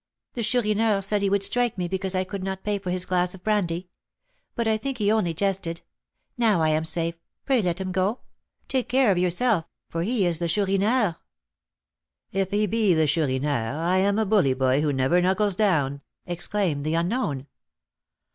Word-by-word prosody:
The 240 - -3
Chourineur 215 -3 +1
said 205 +1 0
he 200 - +1
would 200 0 +1
strike 245 +1 +1
me 180 -1 -1
because 190 +1 -2
I 185 - +1
could 190 0 -6
not 190 0 -4
pay 210 -1 -1
for 185 - -6
his 180 0 0
glass 180 0 0
of 185 - -16
brandy; 185 -5 0 0.7
but 235 -1 -1
I 220 - +3
think 255 +4 -4
he 210 -2 +2
only 215 -6 +1
jested. 190 -3 -1 0.6
Now 220 -6 +3
I 160 -1 +2
am 155 +1 +1
safe, 165 0 0 0.3
pray 265 -4 +3
let 180 -2 -1
him 190 -1 -3
go. 190 +6 0 0.5
Take 260 -2 -1
care 255 -4 +4
of 180 - +1
yourself, 180 +1 +1 0.3
for 165 - -2
he 210 +2 +1
is 170 -2 +1
the 170 - -1
Chourineur." 200 +2 +1 1.1
"If 195 -1 -1
he 205 +1 +1
be 210 -3 +2
the 160 0 +3
Chourineur, 140 -5 0
I 175 +3 +1
am 200 +2 +2
a 220 - +2
bully 190 -11 +3
boy 130 +1 +2
who 150 -1 +1
never 135 +6 +2
knuckles 190 +3 +1
down," 145 -9 +1 0.2
exclaimed 175 -3 -2
the 155 +2 -1
unknown. 170 - -1
190 Hz, 185 wpm, -25 LUFS, 165-210 Hz, 1.1 s, care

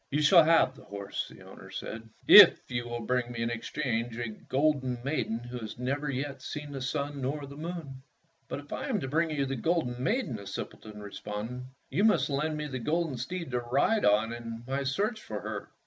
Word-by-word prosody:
"You 150 +2 +1
shall 165 +2 +8
have 165 -4 +4
the - - -15
horse," 100 0 -4
the - - -14
owner - - -12
said, 110 0 -7 0.2
"if - - +9
you 120 -1 -2
will 120 0 -3
bring 125 +1 0
me 115 -1 -3
in 115 - -1
exchange 120 -1 -2
a 120 -2 -2
golden 130 +2 0
maiden 135 -5 -1
who 120 +1 -7
has 110 -1 -7
never 140 +4 -2
yet 135 0 -3
seen 150 +2 -6
either - - -8
the 135 - -5
sun 140 +1 -2
or 145 +2 -2
the 140 0 -10
moon." 155 -4 -6 0.5
"But - - -4
if 145 - -10
I - - -3
am 240 -7 0
to - - -3
bring 160 +4 +1
you 145 -3 0
the 135 0 -2
golden 130 -4 0
maiden," 205 - 0
the 100 -1 -10
simpleton 105 -1 -7
responded, 105 +5 -5 0.3
"you 170 +10 +2
must 215 -8 +4
lend 150 +3 0
me 150 - -3
the 130 -3 -4
golden 160 +3 0
steed 170 +4 -4
to 125 - +1
ride 135 - +2
on 110 +3 +3
in 115 -1 -7
my 135 +2 -1
search 205 - -1
for - - -5
her." - - -5
135 Hz, 215 wpm, -29 LUFS, 120-150 Hz, 0.5 s, if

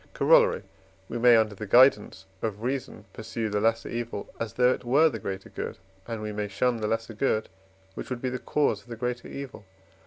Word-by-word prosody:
Corollary. - - +4 0.5
We 120 - -3
may, 120 0 +7
under 110 -2 +2
the 105 +1 -7
guidance 110 -4 +4 0.2
of 110 -1 -3
reason, 125 -4 -4
pursue 110 0 -4
the 105 0 -1
lesser 115 +1 +1
evil 115 -3 -5
as 115 -3 -4
though 125 0 +4
it - - -7
were 140 +7 +4
the 115 - -6
greater 95 0 -6
good, - - -6 0.3
and 115 -2 -5
we 105 - -3
may 105 0 -3
shun 120 +5 0
the 110 -1 -2
lesser 115 +1 -2
good, 110 -1 0 0.4
which - - -7
would 125 -2 -3
be 130 - -2
the 125 - -3
cause 140 -9 0
of - - -25
the 120 - -6
greater 120 +1 -3
evil. 140 -5 -8
115 Hz, 210 wpm, -27 LUFS, 105-125 Hz, 0.5 s, may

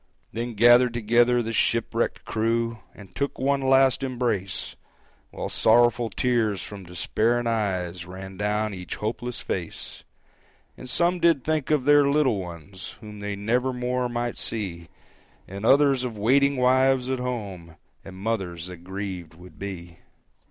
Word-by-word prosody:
Then 120 +1 -4
gathered 120 +2 +6
together 120 +2 +3
the 115 +1 -4
shipwrecked 115 +1 0
crew 115 +1 -1 0.2
And 100 -3 -14
took 140 0 -2
one 140 +1 +1
last 135 0 +4
embrace, 120 -8 -2 0.5
While - - -5
sorrowful 120 +1 +3
tears 110 -5 0
from 100 0 -9
despairing 110 +7 0
eyes 95 -6 -1
Ran 95 +1 -9
down 105 +2 -1
each 90 -1 -6
hopeless 120 +3 -4
face; 90 -3 -5 0.7
And 130 - -9
some 175 +7 +2
did 165 -6 +3
think 155 -3 -1
of 150 -4 +2
their 145 -1 +5
little 140 -7 +2
ones 90 +1 -8
Whom 105 -2 -10
they 100 0 -4
never 120 +6 0
more 125 0 -1
might 120 0 -3
see, 90 -7 -3 0.6
And 100 +4 -4
others 135 -2 +5
of 120 -4 -4
waiting 140 +6 +3
wives 130 0 +3
at 130 - -1
home, 100 -10 -5 0.3
And 95 - -10
mothers 95 -5 -3
that 90 -1 -7
grieved 90 -2 -6
would 90 -2 -15
be. 85 -4 -7
115 Hz, 145 wpm, -25 LUFS, 95-125 Hz, 0.7 s, gathered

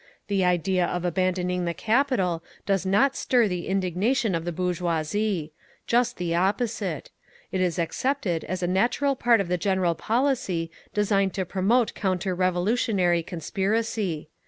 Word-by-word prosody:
The 195 -2 +2
idea 180 0 +2
of 180 0 -3
abandoning 180 0 0
the 170 -1 -2
capital 215 -9 +1 0.2
does 195 -1 0
not 260 +8 +3
stir 245 -4 +2
the 180 -3 -3
indignation 195 +5 0
of 165 0 -2
the 175 - -1
bourgeoisie. 175 0 -1 0.3
Just 245 +1 +1
the 175 -2 -2
opposite. 195 - -1 0.4
It 185 - -1
is 180 -1 0
accepted 175 - -1
as 185 +2 -3
a - - +1
natural 240 +9 +1
part 240 -3 +3
of 195 - -1
the 180 0 -1
general 190 -2 +1
policy 215 - 0 0.2
designed 200 -2 +1
to 190 -2 -1
promote 210 +7 +1
counter 185 -1 -1
revolutionary 185 0 +1
conspiracy. 190 0 -2
185 Hz, 140 wpm, -25 LUFS, 175-215 Hz, 0.4 s, not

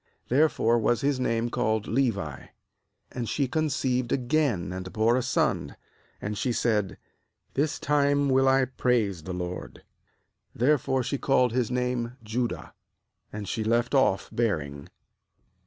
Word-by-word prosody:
Therefore 125 -4 +3
was 115 +1 +1
his 140 -1 +1
name 115 -1 0
called 110 -3 0
Levi. 105 - -1 0.6
^And 120 -3 -4
she 140 -3 0
conceived 130 -4 0
again, 125 - +1
and 95 0 -6
bore 110 +2 +2
a 130 - +2
son; - - 0 0.4
and 105 +1 -4
she 125 +5 -1
said: 105 -5 0 0.6
'This 145 +2 0
time 145 -1 +2
will 135 0 +3
I 135 0 +5
epraise 120 -8 0
the 95 - -4
LORD.' 90 0 -6 0.7
Therefore 130 0 +2
she 140 +2 -2
called 125 -3 +3
his 125 -3 +1
name 125 -1 -1
f 120 - -13
Judah; 120 +3 -3 0.6
and 105 -1 -6
she 110 - -2
left 120 +3 +1
off 130 -8 +3
bearing. 75 -12 -2
120 Hz, 140 wpm, -27 LUFS, 110-135 Hz, 0.7 s, I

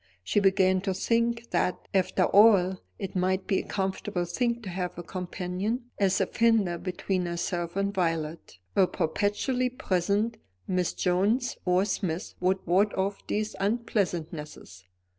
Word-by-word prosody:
She 150 - +2
began 190 -1 +3
to 190 -1 -1
think 235 +2 0
that, 180 - 0
after 185 -1 +2
all, 190 -3 +5 0.2
it 195 -2 -6
might 185 +1 +1
be 190 - +1
a - - -4
comfortable 190 -2 -2
thing 235 +6 0
to 195 - -5
have 180 -1 -3
a 175 - -5
companion 185 +7 -4
as 195 -1 +3
a - - +3
fender 220 -7 +2
between 185 0 -2
herself 170 0 -3
and 200 0 0
Violet. 165 - -2 0.2
A 190 - +5
perpetually 210 - 0
present 205 -1 0 0.3
Miss 180 -2 0
Jones 205 +8 +1
or 180 +1 +3
Smith 185 -4 -2
would 185 +1 0
ward 195 +4 +3
off 195 +1 -2
these 215 +1 -2
unpleasantnesses. 175 - -2
190 Hz, 140 wpm, -28 LUFS, 180-210 Hz, 0.3 s, all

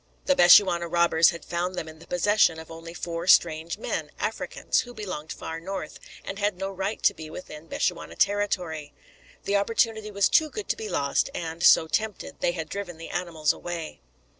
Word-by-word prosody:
The 275 - +3
Bechuana 175 -2 +6
robbers 170 -1 +4
had 170 - -6
found 175 +2 -2
them 165 - -4
in 160 0 -11
the - - -15
possession 180 -1 +3
of 160 0 -10
only 165 +1 -9
four 170 0 -4
strange 165 -2 +4
men, - - -3
Africans, - - -1
who 245 0 -5
belonged 185 -7 -6
far 160 0 -6
north, 185 -2 -6 0.3
and 195 - -5
had 205 -2 0
no 195 +1 -3
right 195 +3 -4
to - - +5
be 155 -1 -9
within 155 -1 -9
Bechuana 80 - -2
territory. 180 - -1 0.5
The 200 0 +1
opportunity 220 +1 0
was 200 -1 +2
too 310 -1 +3
good 425 +5 -6
to - - +2
be 445 -1 -6
lost, - - 0
and, 165 0 -5
so 160 - +6
tempted, 215 +4 -3
they 175 - +1
had 160 -3 -4
driven 185 -2 -6
the 165 - -9
animals 165 -4 0
away. 170 -2 -6
175 Hz, 190 wpm, -26 LUFS, 160-200 Hz, 0.5 s, Bechuana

